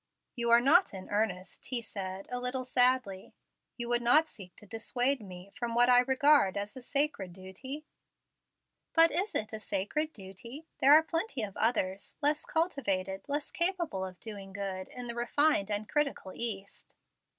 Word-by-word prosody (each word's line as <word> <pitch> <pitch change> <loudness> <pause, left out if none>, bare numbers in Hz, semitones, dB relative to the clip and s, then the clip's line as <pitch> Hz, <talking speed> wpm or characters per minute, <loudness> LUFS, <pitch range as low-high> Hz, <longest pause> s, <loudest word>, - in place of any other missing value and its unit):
"You 235 -2 -1
are 235 0 +6
not 310 - +4
in 185 - -9
earnest," 200 -3 -2
he 255 -2 -1
said, 195 -2 -6
a 250 - -2
little 250 +1 -3
sadly. 250 -6 +2 0.4
"You 240 -1 -4
would 240 0 +1
not 295 +7 +5
seek 190 - -12
to - - -15
dissuade 245 +5 -1
me 185 -1 -11
from 235 -1 -4
what 245 +1 +5
I 245 0 +7
regard 265 -5 +4
as 205 +4 -5
a 260 - -9
sacred 265 - 0
duty?" 225 - -8 1.1
"But 330 0 +6
is 395 +4 -2
it 215 0 -2
'a 220 - -4
sacred 260 +10 -2
duty'? 230 - -11
There 280 +2 +7
are 315 - +6
plenty 330 - -2
of 200 -2 -6
others 200 -4 -1
less 295 0 +1
cultivated, 195 - -1
less 290 +1 -3
capable 340 - 0
of 185 -1 -7
doing 200 -4 -9
good 195 -2 -5
in 250 -1 -7
the 235 - -2
refined 240 -2 +2
and 205 0 -2
critical 280 -10 -1
East." 200 -4 -5
235 Hz, 170 wpm, -30 LUFS, 195-280 Hz, 1.1 s, I